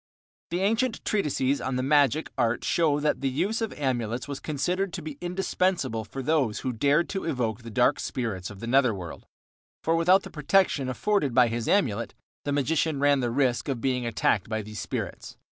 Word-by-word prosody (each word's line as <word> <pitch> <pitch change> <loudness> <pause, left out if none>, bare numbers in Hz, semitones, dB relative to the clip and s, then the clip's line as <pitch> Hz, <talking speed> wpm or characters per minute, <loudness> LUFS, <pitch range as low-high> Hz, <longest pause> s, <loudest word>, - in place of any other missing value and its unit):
The 175 +2 -1
ancient 225 +4 0
treatises 145 -8 0
on 130 0 -2
the 130 - -1
magic 145 +1 +3
art 120 -2 0
show 155 -4 +2
that 150 -1 0
the 135 - +1
use 200 - -1
of 225 - -1
amulets 125 -4 -2
was 140 -1 -5
considered 180 +6 -1
to - - -4
be 150 -2 -7
indispensable 175 - -1
for 135 +6 -6
those 135 -7 +1
who 130 - -2
dared 145 +8 +2
to 195 - -3
evoke 120 -7 -1
the 115 - -9
dark 125 +5 +2
spirits 110 -8 -3
of 100 -2 -11
the - - -4
nether 125 -2 +3
world, 90 -3 -8 0.6
for 165 - +2
without 180 +4 +4
the - - -9
protection 150 -3 +2
afforded 145 - 0
by 125 -2 +5
his 115 0 -3
amulet 115 - +1 0.3
the 145 - -1
magician 145 +1 +1
ran 145 0 +4
the 120 -2 0
risk 125 -1 +1
of 130 -3 -1
being 125 0 0
attacked 110 -3 0
by 110 -1 -2
these 105 0 -8
spirits. - - -5
135 Hz, 195 wpm, -27 LUFS, 120-165 Hz, 0.6 s, by